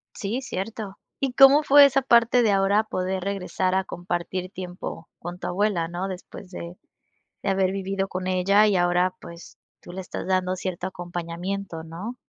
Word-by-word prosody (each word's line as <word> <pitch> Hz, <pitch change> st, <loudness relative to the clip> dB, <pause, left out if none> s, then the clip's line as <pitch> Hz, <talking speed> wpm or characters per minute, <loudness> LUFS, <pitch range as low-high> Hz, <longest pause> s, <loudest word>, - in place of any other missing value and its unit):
Sí, 220 Hz, +6 st, -3 dB
cierto 210 Hz, -3 st, -5 dB, 0.2 s
¿Y 270 Hz, -3 st, -1 dB
cómo 275 Hz, +3 st, +7 dB
fue 285 Hz, 0 st, +8 dB
esa 275 Hz, 0 st, +3 dB
parte 240 Hz, -1 st, +4 dB
de 215 Hz, -, +3 dB
ahora 200 Hz, +2 st, +3 dB
poder 185 Hz, -3 st, -3 dB
regresar 190 Hz, -1 st, -1 dB
a 190 Hz, -, +2 dB
compartir 175 Hz, +1 st, -4 dB
tiempo 180 Hz, -3 st, -7 dB
con 175 Hz, +1 st, -7 dB
tu -, -, -4 dB
abuela, 185 Hz, -3 st, 0 dB
no? 175 Hz, +3 st, -4 dB
Después 185 Hz, 0 st, -9 dB
de 175 Hz, 0 st, -8 dB, 0.7 s
de -, -, 0 dB
haber 190 Hz, -1 st, +1 dB
vivido 195 Hz, 0 st, -2 dB
con 185 Hz, -1 st, -4 dB
ella 200 Hz, +3 st, +4 dB
y 200 Hz, -, +2 dB
ahora 180 Hz, +1 st, +2 dB
pues, 170 Hz, 0 st, -12 dB, 0.2 s
tú -, -, -13 dB
le 185 Hz, +2 st, -6 dB
estás 185 Hz, -, -6 dB
dando 185 Hz, -1 st, +1 dB
cierto 185 Hz, -1 st, -4 dB
acompañamiento, 175 Hz, 0 st, -5 dB
¿no? 175 Hz, +9 st, -7 dB
190 Hz, 170 wpm, -25 LUFS, 180-205 Hz, 0.7 s, fue